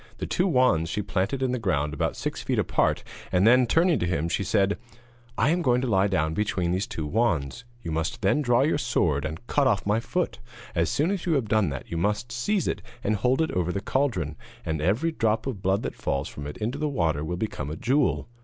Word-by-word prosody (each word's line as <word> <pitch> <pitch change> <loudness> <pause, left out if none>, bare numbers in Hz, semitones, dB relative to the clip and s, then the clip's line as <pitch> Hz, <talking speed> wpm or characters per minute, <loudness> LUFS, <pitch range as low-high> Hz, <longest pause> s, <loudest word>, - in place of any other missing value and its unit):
The - - -3
two 185 - +1
wands 125 - +3
she 105 - -2
planted 100 +7 -1
in 130 - +1
the 125 - -1
ground 75 -8 0
about 75 - -1
six - - -4
feet - - -1
apart, - - +1 0.3
and 90 +2 +3
then, 125 +2 +6
turning 165 +5 +3
to 90 - 0
him, 85 -2 -1
she 100 - 0
said: 100 +1 +1 0.6
'I 120 - +3
am 175 +1 +1
going 125 -5 +3
to 130 - -1
lie 100 -3 +3
down 80 -5 0
between 95 -3 0
these 95 +4 -1
two 80 - -4
wands. 85 - 0 0.2
You 80 - -4
must 80 +6 -2
then 125 +10 +3
draw 125 -2 +3
your 150 0 +1
sword 85 - +1
and 80 +9 -6
cut 140 +1 +2
off 105 -6 +1
my 105 +2 +2
foot, 180 +9 -2 0.3
and, 85 - +1
as 85 - +1
soon 155 +6 +1
as 190 -3 -3
you 170 - +3
have 135 -7 +1
done 105 -4 +2
that, 70 -2 -7
you 85 - -2
must 105 +6 -1
seize 175 - 0
it - - -2 0.2
and 105 - +1
hold 125 +8 +2
it 160 - -2
over 90 -1 0
the 100 - -2
cauldron, 95 - -1 0.3
and 80 -1 -2
every 110 - +1
drop 110 -7 0
of 125 -8 -4
blood 95 +3 +1
that - - -3
falls 70 +2 -2
from 75 0 -7
it 75 - -7
into 120 +7 -3
the 150 0 0
water 80 - 0
will 90 +3 -3
become 85 -8 -3
a 75 - -4
jewel. 130 - +1
105 Hz, 240 wpm, -26 LUFS, 85-130 Hz, 0.6 s, then